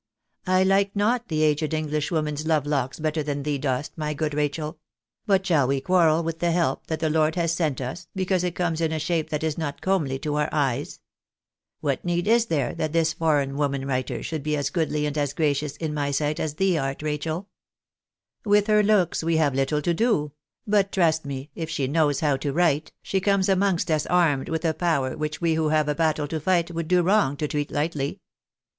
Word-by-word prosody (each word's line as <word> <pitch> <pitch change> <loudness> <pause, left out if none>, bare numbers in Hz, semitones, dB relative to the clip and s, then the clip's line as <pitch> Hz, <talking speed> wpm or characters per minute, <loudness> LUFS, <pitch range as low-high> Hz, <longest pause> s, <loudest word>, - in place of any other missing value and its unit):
I 185 0 +4
like 195 +1 +2
not 235 +4 +1
the 155 -1 0
aged 155 +1 +1
Englishwoman's 150 0 -2
love 155 -3 +2
locks 140 -3 -1
better 155 0 -1
than 145 -1 -3
thee 145 -1 -1
dost, 135 +1 -2
my 150 -1 -3
good 150 0 -2
Rachel; 150 +2 -2 0.5
but 190 -2 +3
shall 155 -8 +3
we 135 +1 +1
quarrel 165 +1 +3
with 165 0 -4
the 175 - +1
help 165 -6 0
that 160 - -2
the 160 -1 0
Lord 155 +1 +2
has 170 -2 +1
sent 160 -5 -1
us, 135 +7 -6
because 185 -1 0
it 175 -1 -2
comes 165 -2 -1
in 160 -1 +1
a 160 - -1
shape 160 0 -1
that 150 0 -2
is 160 0 -1
not 145 -3 -3
comely 160 -9 0
to 150 +2 -2
our 150 0 +1
eyes? 140 -2 -1 0.8
What 140 -3 -1
need 175 +1 -1
is 230 +1 +4
there 145 - 0
that 155 -2 -3
this 165 -1 +2
foreign 145 -4 +1
woman 140 -2 -1
writer 130 -2 -2
should 160 -2 -3
be 150 +1 -1
as 140 -1 -1
goodly 155 -3 0
and 150 0 -2
as 145 -1 -1
gracious 150 -1 -1
in 155 -1 -3
my 145 -1 -1
sight 145 +1 -1
as 150 -2 -2
thee 185 -1 +2
art, 135 +1 -3
Rachel? 155 +5 -3 1.0
With 205 -1 +3
her 210 -1 +4
looks 200 -6 +2
we 165 0 +1
have 150 -4 +2
little 135 +3 0
to 170 - +1
do; 165 -8 +1 0.3
but 200 -2 +2
trust 160 -4 +2
me, 135 +1 -6
if 165 -1 -5
she 150 -4 -1
knows 145 -1 +1
how 145 -3 +2
to 140 +1 -2
write, 155 -1 +1
she 190 - -1
comes 200 0 +2
amongst 190 -3 +1
us 155 -1 +1
armed 165 -7 +2
with 160 +1 -2
a 160 - +2
power 150 -7 0
which 150 0 -4
we 165 -1 +2
who 160 -1 +1
have 155 -1 +2
a 150 - +1
battle 155 -1 0
to 160 - -2
fight 175 +1 +1
would 165 -1 -4
do 180 0 +3
wrong 185 -7 +2
to 150 - -1
treat 145 0 -2
lightly. 145 -2 -2
155 Hz, 215 wpm, -25 LUFS, 145-170 Hz, 1.0 s, I